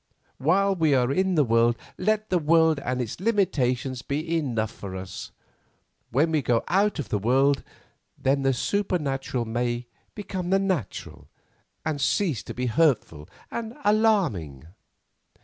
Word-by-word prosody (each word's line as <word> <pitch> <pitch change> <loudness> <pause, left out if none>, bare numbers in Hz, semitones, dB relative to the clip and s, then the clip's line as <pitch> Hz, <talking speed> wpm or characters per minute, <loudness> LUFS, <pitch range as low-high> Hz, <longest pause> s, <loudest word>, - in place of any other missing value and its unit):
While 195 +8 +3
we 160 -5 +3
are 125 0 +2
in 190 +4 +1
the 150 - +4
world 115 -1 +3 0.2
let 215 +2 0
the 180 - +3
world 160 -1 +4
and 125 -1 -2
its 120 +2 -4
limitations 135 - 0
be 155 +5 -2
enough 115 -9 -1
for 95 -2 -8
us. 95 +2 -7 0.8
When 150 +7 +2
we 155 -2 +2
go 120 -2 +1
out 200 +3 +2
of 150 - -4
the 105 - 0
world, 135 +6 +3 0.6
then 135 +1 +1
the 135 0 +3
supernatural 135 -6 -1
may 120 +1 -2 0.3
become 190 -4 -4
the 195 - +4
natural, 190 - -3 0.6
and 155 -3 -2
cease 165 - +1
to - - -7
be 125 - -2
hurtful 120 - +1 0.2
and 230 0 -5
alarming." 185 - +2
140 Hz, 145 wpm, -25 LUFS, 120-185 Hz, 0.8 s, the